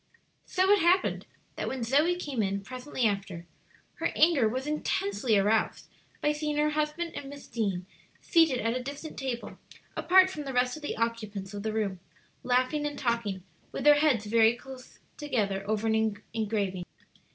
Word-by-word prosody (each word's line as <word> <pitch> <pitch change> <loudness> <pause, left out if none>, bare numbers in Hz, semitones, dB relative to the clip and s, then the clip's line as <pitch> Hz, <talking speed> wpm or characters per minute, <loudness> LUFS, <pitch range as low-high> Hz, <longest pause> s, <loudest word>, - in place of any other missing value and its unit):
So 375 +1 +2
it 410 - +6
happened 360 +2 +2 0.3
that - - -2
when 260 -2 -3
Zoe 295 +9 +3
came 290 -9 -3
in 200 0 -1
presently 255 +2 -3
after, 195 -5 -2 0.5
her 330 - +1
anger 305 -8 +4
was 260 +4 -3
intensely 220 -7 0
aroused 210 +3 +1 0.3
by 295 - +2
seeing 300 0 -2
her 300 0 +2
husband 305 +3 -1
and 275 - -7
Miss 285 0 -10
Deane 195 -6 -2 0.3
seated 325 -7 +3
at 230 +1 0
a 255 - -2
distant 280 +4 -7
table, 260 -3 -5 0.4
apart 375 +1 +5
from 305 - -5
the 270 - -4
rest 250 0 +2
of 310 - -10
the 295 - -4
occupants 215 -4 -3
of 205 - -5
the 220 +1 -2
room, 205 -4 -2 0.4
laughing 255 +4 +1
and 290 - -6
talking 230 -7 -1 0.3
with - - -4
their 295 0 +7
heads 270 -9 +2
very 225 +2 +4
close 260 0 -12 0.2
together 210 -10 -1
over 215 0 0
an 220 -1 +1 0.2
engraving. 200 -5 -1
250 Hz, 170 wpm, -29 LUFS, 215-295 Hz, 0.5 s, their